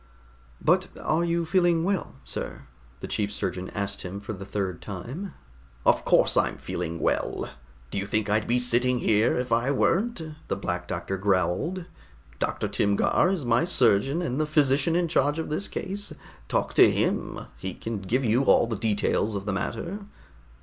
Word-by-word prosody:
"But - - +3
are 160 +2 +1
you 170 0 0
feeling 175 -1 +3
well, 195 0 -1
sir?" - - -5 0.4
the - - -5
chief 105 -1 -1
surgeon 95 -2 -3
asked 100 0 -3
him 95 +2 -6
for 100 +2 -6
the 100 0 -8
third 95 -4 -3
time. 125 - -6 0.5
"Of - - +4
course - - +4
I'm - - +2
feeling 85 -1 -4
well. - - -1 0.4
Do - - -1
you 100 - -3
think 105 +1 0
I'd 105 +1 +1
be 120 - +3
sitting 125 +1 +2
here 110 -1 +2
if 125 -1 -2
I 120 +3 +2
weren't?" 190 - +1 0.3
the - - -1
Black 90 -3 -3
Doctor 95 +1 -3
growled. 100 - 0 0.5
"Dr. - - -1
Timgar 100 - +2
is 185 -8 -1
my 120 +5 +3
surgeon 135 - +3
and 140 -2 -1
the 155 - 0
physician 150 +1 +3
in 175 0 +2
charge 145 -2 +2
of 160 -2 -3
this 195 +6 -1
case. 200 +1 -5 0.4
Talk - - 0
to - - +7
him. - - -1 0.2
He 95 -1 -5
can 115 -2 -4
give 125 +8 0
you 120 +5 +3
all - - +5
the 115 -1 -3
details 105 0 0
of 100 0 -4
the 105 - -1
matter." 175 - -3
120 Hz, 175 wpm, -26 LUFS, 100-165 Hz, 0.5 s, to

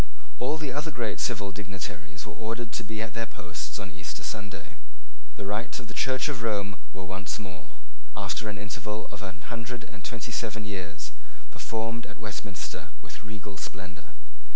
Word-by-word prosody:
All 155 - +5
the 150 -5 +1
other 150 +3 +3
great 120 -7 +2
civil 100 -5 +4
dignitaries 95 -1 -2
were 105 - -3
ordered 115 +1 0
to 115 - +2
be 110 +1 +1
at 110 - -2
their 115 0 +2
posts 90 -6 -1
on - - -2
Easter - - -2
Sunday. 100 -6 -2 0.6
The - - -1
rites 105 +4 +2
of 125 - -3
the 105 - -5
Church 130 +3 +5
of 140 -6 +1
Rome 100 -3 +4 0.2
were 95 +1 -3
once 95 +1 +1
more, 90 - -5 0.5
after 110 - +2
an 100 - 0
interval 105 +1 0
of 105 - -4
a 95 -2 -1 0.2
hundred 115 0 -1
and 105 -3 -8
twenty 120 +1 0
seven 110 -2 +2
years, 85 -9 -1 0.4
performed 115 +1 +1
at - - -8
Westminster 100 -3 -1
with - - -6
regal 100 -1 -4
splendour. 90 -3 -4
105 Hz, 175 wpm, -33 LUFS, 95-115 Hz, 0.6 s, All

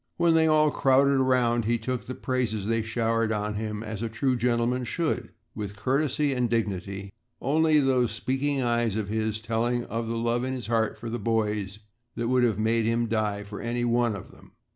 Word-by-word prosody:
When 170 -1 +4
they 160 0 +4
all 155 -1 +4
crowded 140 0 +3
around, 120 -3 +2
he 120 +2 +2
took 125 +2 -4
the 130 - -5
praises 120 -6 -1
they 115 +1 +1
showered 115 0 0
on 105 0 -1
him 105 0 -4
as 110 -1 -5
a 115 - -2
true 125 +3 0
gentleman 120 +1 +1
should 160 +6 -2 0.2
with 105 -2 -5
courtesy 140 +4 0
and 125 -2 0
dignity, 100 -3 -2 0.3
only 155 +2 +3
those 130 -4 +2
speaking 135 +4 -1
eyes 120 -3 +1
of 105 -2 -2
his 110 0 -1
telling 115 +2 -1
of 115 +2 -3
the 115 0 -2
love 120 +1 0
in 130 0 -2
his 125 -2 -5
heart 110 -1 0
for 115 -1 -6
the 120 - -3
boys 105 -2 -1 0.4
that 115 0 -2
would 125 -1 +3
have 115 -5 +2
made 110 +1 +1
him 115 +1 +1
die 105 -2 -1
for 105 0 -8
any 120 +1 -1
one 120 -2 +2
of 100 - -9
them. - - -19
115 Hz, 200 wpm, -27 LUFS, 110-130 Hz, 0.4 s, When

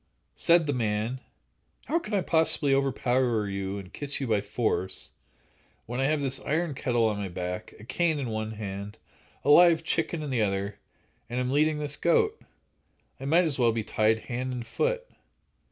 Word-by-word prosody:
Said 170 -1 +4
the 145 - 0
man: 115 +1 -1 0.7
"How 335 - +1
can 215 -9 -4
I 195 - +2
possibly 160 -4 +3
overpower 125 -4 +1
you 100 0 -3
and 95 -1 -9
kiss 145 -1 -3
you 135 - -2
by 110 -4 +1
force, 105 -2 -1 0.7
when 120 +2 -4
I 135 - +2
have 150 +1 +1
this 135 -1 +2
iron 160 +1 -1
kettle 120 -3 +1
on 105 -2 0
my 100 -2 -3
back, 90 +1 -5
a - - -12
cane 160 +6 0
in 135 -4 -3
one 110 0 -3
hand, 100 -1 -6 0.5
a 145 - +5
live 170 0 +7
chicken 165 0 -1
in 145 - -4
the 120 -3 +1
other, 100 0 -1 0.5
and 120 +1 -2
am 125 0 -1
leading 150 +2 +2
this 145 -1 -2
goat? 435 - +2 0.8
I 135 - -7
might 165 +6 +4
as 150 -5 -1
well 120 -2 +4
be 115 -1 -2
tied 110 +1 +1
hand 125 +2 -4
and 120 -2 -5
foot." - - -1
125 Hz, 185 wpm, -27 LUFS, 110-150 Hz, 0.8 s, live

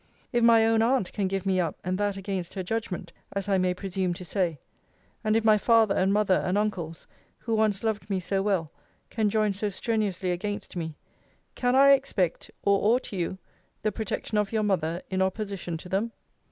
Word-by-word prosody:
If 240 -1 +2
my 230 -1 +6
own 225 0 +3
aunt 235 -4 +1
can 200 -2 0
give 195 0 -2
me 190 -1 +2
up, 170 -2 -1
and 185 +1 -1
that 205 -1 0
against 190 -2 -4
her 190 - -2
judgment, 185 -4 -4 0.2
as 200 0 -2
I 195 -2 +2
may 180 0 +1
presume 185 -1 -2
to 180 - -7
say; 175 -4 0 0.7
and 215 0 +2
if 225 - 0
my 215 -1 +5
father 225 -2 +4
and 190 +1 +2
mother, 200 -2 +3
and 185 +2 0
uncles, 180 -6 -2 0.3
who 225 - -4
once 215 -2 +1
loved 215 -2 -2
me 195 -2 0
so 195 +2 -1
well, 190 -6 0 0.4
can 215 -2 +1
join 215 -1 +1
so 205 +2 -2
strenuously 200 -3 -1
against 205 +4 -4
me; 160 -3 -4 0.6
can 245 0 +1
I 275 +1 +7
expect, 245 -10 +1
or 200 +1 +3
ought 255 - -4
you, 185 0 -2 0.5
the 215 - +1
protection 215 0 -2
of 205 -1 -1
your 220 -1 +1
mother, 175 -4 0
in 190 0 0
opposition 190 -3 -2
to 170 - -10
them? 205 +5 -1
200 Hz, 195 wpm, -27 LUFS, 185-215 Hz, 0.7 s, I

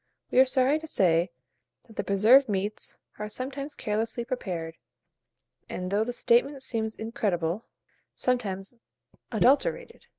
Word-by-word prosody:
We - - +4
are 260 - +7
sorry 260 +4 +3
to 320 - -9
say 175 - +2 0.6
that 220 - -17
the - - -2
preserved 220 +7 +5
meats 205 +1 -2 0.2
are 210 0 -4
sometimes 275 +5 -4
carelessly 225 +3 -2
prepared, 175 -10 -4 0.9
and, 180 +1 -4
though 205 +2 +2
the 240 - -3
statement 255 +3 +2
seems 220 -3 -2
incredible, 200 -4 -2 0.5
sometimes 205 -5 -1 0.6
adulterated. 290 - +1
225 Hz, 125 wpm, -27 LUFS, 195-260 Hz, 0.9 s, are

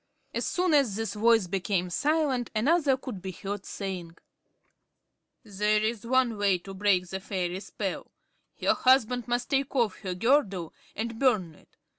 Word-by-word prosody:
As - - -1
soon 360 -2 +1
as 270 -9 +3
this 225 -2 -3
voice 225 -1 +4
became 180 -1 -1
silent, 280 - +1
another 280 +3 +3
could 245 -7 -7
be 190 - -5
heard, 195 +2 -6
saying: 180 -4 -6 1.3
"There 210 0 +1
is 220 +1 -2
one 250 -4 +2
way 200 -2 +3
to 195 +2 -10
break 190 -2 +2
the 190 - -4
fairy 185 -2 -3
spell. - - -5 0.5
Her - - +3
husband 250 -2 +3
must 245 0 -1
take 275 0 0
off 230 -7 +1
her 185 -3 -4
girdle 195 - +1 0.2
and 225 +1 -4
burn 215 -11 +2
it. - - -24
215 Hz, 155 wpm, -28 LUFS, 190-255 Hz, 1.3 s, voice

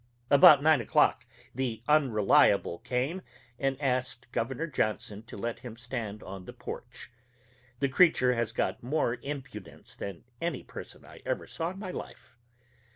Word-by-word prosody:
About 145 -1 +9
nine 155 -4 +5
o'clock 115 - +2 0.3
the 120 -3 -3
Unreliable 110 - +4
came 135 +9 -2 0.4
and 135 -1 0
asked 130 -2 -1
Gov. 135 +6 -2
Johnson 105 -1 -1
to - - -10
let 115 +3 -3
him 120 -2 -9
stand 115 -4 -5
on 95 -1 -8
the - - -9
porch. - - -8 0.7
The 140 - +3
creature 130 -4 +4
has 115 -2 -1
got - - -1
more 125 -2 0
impudence 135 - -8
than 100 -4 -7 0.2
any 170 -6 -2
person - - -10
I - - -14
ever - - -2
saw 165 +1 -3
in 190 - -8
my 190 -2 -5
life. 130 - -9
125 Hz, 150 wpm, -29 LUFS, 115-145 Hz, 0.7 s, About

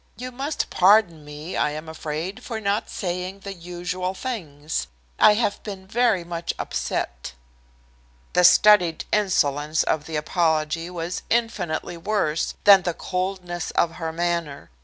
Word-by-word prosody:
"You 255 +1 -6
must 275 +4 -3
pardon 185 -4 +4
me, 150 +3 -8
I - - +2
am 155 +2 -6
afraid, 160 +8 -5
for 225 -3 -4
not 205 0 -1
saying 180 +1 -4
the 200 0 -6
usual 180 +1 -4
things. 160 - -4 0.3
I 210 - +7
have 210 -2 0
been 195 -3 -8
very 220 -3 +2
much 170 0 -4
upset." 60 -2 -3 1.0
The 180 - +4
studied 180 -3 +6
insolence 155 -7 +1
of 150 -2 -1
the 160 - -5
apology 160 +1 0
was 175 0 -4
infinitely 185 -8 -1
worse 165 -4 -1
than 200 -2 +8
the 175 -2 -2
coldness 180 -2 -3
of 170 -1 +2
her 160 -2 -3
manner. 170 - -2
175 Hz, 140 wpm, -24 LUFS, 160-200 Hz, 1.0 s, than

